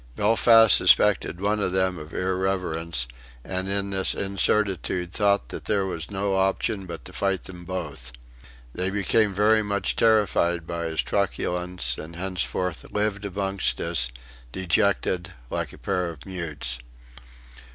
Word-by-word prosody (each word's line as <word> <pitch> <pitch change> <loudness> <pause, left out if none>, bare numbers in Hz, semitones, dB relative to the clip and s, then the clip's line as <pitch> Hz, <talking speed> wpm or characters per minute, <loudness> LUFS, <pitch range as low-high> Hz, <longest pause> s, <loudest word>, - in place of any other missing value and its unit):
Belfast 115 +1 +7
suspected 95 -4 +5
one 105 +2 0
of 95 -3 -1
them 95 -2 +1
of 75 +1 -10
irreverence, 90 -7 -1 0.4
and 95 0 -4
in 100 0 -1
this 95 -1 +1
incertitude 95 -2 0
thought 100 - +2
that - - -6
there 100 -2 +1
was 85 -5 -5
no 95 -1 -1
option 95 0 0
but 85 -7 -8
to - - -8
fight 95 -1 -1
them 90 -2 -10
both. 80 -9 -5 0.6
They 90 +1 -1
became 105 +2 +2
very 105 +3 +3
much 100 -1 -1
terrified 90 -6 +2
by 85 0 -4
his 80 -1 -1
truculence, 90 -8 -2
and 85 +2 -9
henceforth 90 -1 -3
lived 105 -1 -1
amongst 95 -9 -1
us, 60 0 0 0.4
dejected, 95 +1 0 0.2
like - - -3
a - - -13
pair 90 -1 -2
of 80 -3 -11
mutes. 80 -10 -3
95 Hz, 140 wpm, -25 LUFS, 85-100 Hz, 0.6 s, Belfast